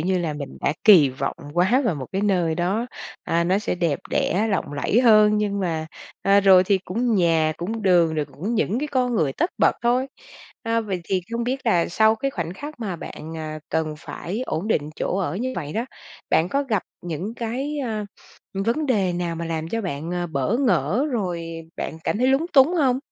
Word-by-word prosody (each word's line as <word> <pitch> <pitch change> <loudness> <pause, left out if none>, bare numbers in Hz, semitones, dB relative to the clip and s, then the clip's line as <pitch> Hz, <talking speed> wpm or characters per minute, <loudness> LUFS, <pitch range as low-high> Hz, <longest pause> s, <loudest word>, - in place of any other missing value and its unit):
như 185 +3 +1
là 160 -4 -2
mình 145 -2 -7
đã - - +1
kỳ 180 -10 +8
vọng 135 +1 -3 0.2
quá 190 +9 +3
vào 205 - +1
một 130 -4 -6
cái 195 - -1
nơi 180 -6 +2
đó, 190 +8 0 0.4
à, 170 +1 +1
nó 185 +3 +2
sẽ 210 - -2
đẹp 170 -5 0
đẽ, 205 +6 +1
lộng 185 -7 -1
lẫy 145 +11 +1
hơn 215 -3 +6
nhưng 200 -1 -1
mà, 165 -4 -2 0.4
à, 200 +1 +5
rồi 190 -2 +6
thì 195 0 +2
cũng 230 +5 0
nhà, 165 -4 +3
cũng 215 +6 -4
đường 175 -4 +4
rồi 155 -1 0
cũng 200 +11 -5
những 225 +1 +1
cái 300 - -2
con 250 -3 0
người 155 -10 +1
tất 340 +3 0
bật - - +3
thôi. 250 +3 +2 0.6
À, 230 0 +1
vậy 195 -5 -3
thì 185 +1 0
không 235 0 -1
biết 260 +1 -3
là 175 -7 +3
sau 220 +5 +4
cái 275 +5 -2
khoảnh 170 -8 -4
khắc 295 +4 -8
mà 195 -6 -3
bạn, 160 -1 -8
ờ, 155 -1 -5
cần 160 -1 -1
phải 195 +8 -5
ổn 170 +8 -2
định 150 -7 0
chỗ 190 - -1
ở 175 -3 -2
như 255 +5 -2
vậy 150 -3 -4
đó, 230 +6 -1 0.5
bạn 165 +3 +3
có 280 +7 0
gặp 220 -8 -1 0.2
những 175 +6 -4
cái, 260 +6 -3
a, 220 -6 -2 0.5
vấn 230 +10 0
đề 200 -9 +1
nào 175 -1 -2
mà 170 - -4
làm 165 -1 -3
cho 230 - -2
bạn, 165 -4 -4
ờ, 175 0 -2
bỡ 155 - 0
ngỡ 245 - +1
rồi 180 -7 -2 0.3
bạn 160 - -5
cảm 210 - 0
thấy 255 - +2
lúng 270 +5 +2
túng 280 +5 +6
hông? 265 -6 +2
195 Hz, 215 wpm, -23 LUFS, 165-230 Hz, 0.6 s, kỳ